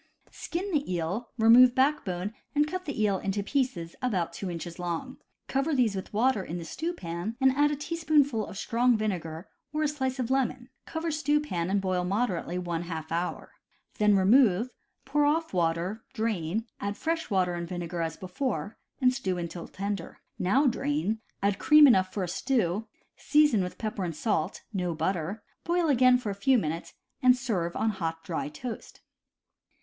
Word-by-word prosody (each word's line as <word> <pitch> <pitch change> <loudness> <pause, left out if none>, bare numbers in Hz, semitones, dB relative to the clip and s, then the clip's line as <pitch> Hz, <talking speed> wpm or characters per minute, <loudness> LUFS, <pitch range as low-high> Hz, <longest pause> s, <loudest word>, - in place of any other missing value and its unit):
— - - -42
Skin 375 +4 -4
the 290 - 0
eel, 180 +7 -2
remove 240 +2 +7
backbone 215 -9 +1 0.2
and 295 +1 +3
cut 370 +3 -4
the 270 -7 -2
eel 200 -3 +2
into 200 +1 -2
pieces 250 -10 -1
about 185 -10 -1
two 185 +2 -5
inches 170 0 -6
long; 175 +9 -4 0.3
cover 275 +3 0
these 235 -6 +2
with 190 - -5
water 225 -1 +2
in 175 0 -5
the 170 - -6
stew 325 - -3
pan, 175 - -5
and 265 -1 +5
add 290 +2 +3
a 295 - -1
teaspoonful 295 -6 +1
of - - -9
strong 240 +2 +2
vinegar 175 -6 -3 0.2
or 305 +1 0
a - - +3
slice 265 -3 -2
of 250 -1 -2
lemon, 260 -1 0 0.2
cover 325 0 -2
stew 295 0 +2
pan 180 - -2
and 200 0 +1
boil 185 -1 0
moderately 185 -3 -1
one 175 -2 -2
half 165 -2 -6
hour. 170 +2 -3 0.5
Then 210 -1 +5
remove, 215 +2 +4 0.4
pour 295 +2 +2
off 315 0 +1
water, 175 +5 0
drain, 215 -2 -1
add 200 +1 -3
fresh 325 0 -2
water 185 -3 +1
and 170 0 -4
vinegar 175 -1 -4
as 165 -1 -3
before, 205 +3 -3 0.2
and 255 -2 +4
stew 190 -9 -2
until 170 0 -5
tender. 200 -2 -5 0.2
Now 250 +11 +3
drain, 265 -4 0 0.2
add 200 0 +1
cream 300 -1 +8
enough 190 -8 +5
for 195 - -2
a - - -2
stew, 215 0 0 0.3
season 295 -8 +4
with 180 0 -4
pepper 215 -3 -3
and 170 -3 -3
salt 160 -3 -1
(no 180 -4 -1
butter), 180 +5 -2 0.2
boil 340 -1 +1
again 255 -2 +5
for 225 -5 -4
a - - -2
few 245 +7 +3
minutes, 165 -4 -3 0.3
and 255 -1 +6
serve 195 -10 -2
on 220 - +1
hot, 165 -4 -4
dry 160 -3 -3
toast. 225 +10 -8
215 Hz, 180 wpm, -28 LUFS, 180-265 Hz, 0.5 s, cream